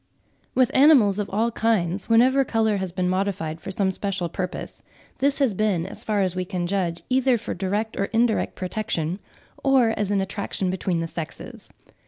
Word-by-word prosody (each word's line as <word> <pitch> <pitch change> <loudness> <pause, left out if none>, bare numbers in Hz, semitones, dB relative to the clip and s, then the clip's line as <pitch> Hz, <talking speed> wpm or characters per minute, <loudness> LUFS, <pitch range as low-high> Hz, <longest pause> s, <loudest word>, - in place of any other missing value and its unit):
With 255 -2 +3
animals 260 -9 +5
of 205 - -2
all 225 +4 0
kinds, 205 -5 0
whenever 255 +4 +5
colour 220 -4 +1
has 190 -2 -3
been 180 0 -1
modified 185 -4 -2
for 190 - -7
some 190 0 0
special 190 -2 -3
purpose, 180 +2 -5 0.4
this 280 +1 +2
has 270 -7 +2
been, 195 -4 0
as 190 - -7
far 210 -2 0
as 185 -2 0
we 185 - -1
can 180 -1 -3
judge, 175 -2 -2
either 260 -1 +3
for 230 - -5
direct 205 +4 -2
or 200 - 0
indirect 225 +1 +1
protection, 185 -3 -3 0.4
or 265 -4 +4
as 205 -2 -1
an 205 -1 +1
attraction 195 -1 -2
between 185 -2 -1
the 165 - -2
sexes. 165 -1 -8
200 Hz, 180 wpm, -24 LUFS, 185-225 Hz, 0.4 s, animals